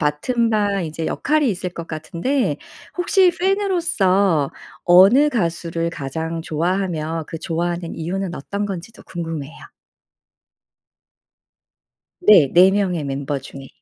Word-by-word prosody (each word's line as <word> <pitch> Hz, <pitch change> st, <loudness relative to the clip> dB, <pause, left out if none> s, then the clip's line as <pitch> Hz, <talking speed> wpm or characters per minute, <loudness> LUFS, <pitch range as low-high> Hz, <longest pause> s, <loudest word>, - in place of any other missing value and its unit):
맡은 225 Hz, -, 0 dB
바 205 Hz, -3 st, +1 dB
이제 160 Hz, 0 st, -4 dB
역할이 300 Hz, -2 st, +1 dB
있을 185 Hz, -2 st, -3 dB
것 170 Hz, -1 st, -8 dB
같은데 170 Hz, -, -2 dB, 0.4 s
혹시 365 Hz, 0 st, +4 dB
팬으로서 335 Hz, -, +1 dB, 0.3 s
어느 195 Hz, +12 st, +6 dB
가수를 170 Hz, -, -2 dB
가장 160 Hz, +3 st, -5 dB
좋아하며 165 Hz, -1 st, -2 dB
그 165 Hz, -, -6 dB
좋아하는 170 Hz, +1 st, -3 dB
이유는 180 Hz, +2 st, -4 dB
어떤 200 Hz, +8 st, -4 dB
건지도 195 Hz, +2 st, -8 dB
궁금해요. 165 Hz, -4 st, -6 dB, 2.7 s
네. 190 Hz, -, +6 dB
4 180 Hz, +2 st, +7 dB
명의 185 Hz, -6 st, 0 dB
멤버 140 Hz, +1 st, -3 dB
중에. 135 Hz, 0 st, -11 dB
175 Hz, 240 characters per minute, -20 LUFS, 160-205 Hz, 2.7 s, 4